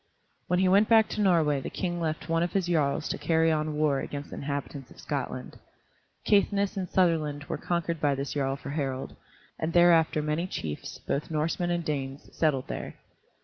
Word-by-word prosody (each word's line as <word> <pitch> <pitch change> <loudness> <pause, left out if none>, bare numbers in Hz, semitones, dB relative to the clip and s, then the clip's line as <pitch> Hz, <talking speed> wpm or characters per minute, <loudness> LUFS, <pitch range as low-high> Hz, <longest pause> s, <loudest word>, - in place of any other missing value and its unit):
When 180 - +2
he 185 +1 +3
went 200 +3 +4
back 225 -1 +6
to 215 - -2
Norway 160 -7 +3
the - - -5
King 175 -2 -3
left 155 -1 -2
one 165 0 +1
of 175 - -1
his 195 -3 +1
jarls 155 -5 +1
to - - -3
carry 160 -1 +3
on 155 -1 -1
war 150 -2 +2
against 145 +1 -6
the - - -6
inhabitants 140 -1 -5
of - - -16
Scotland. - - -4 0.7
Caithness 200 -1 +2
and 185 -3 -3
Sutherland 155 -5 +1
were - - -4
conquered 170 -2 -2
by 145 -2 +2
this 140 +1 -4
jarl 135 -2 0
for 140 0 -7
Harald, 135 -3 -3 0.4
and 160 +1 -2
thereafter 165 -3 +5
many 155 +4 -1
chiefs, 75 - -5
both 140 - -3
Norsemen 165 +3 -1
and 175 -1 -1
Danes, 140 -2 -4
settled 145 -5 +1
there. - - -5
160 Hz, 190 wpm, -28 LUFS, 145-175 Hz, 0.7 s, back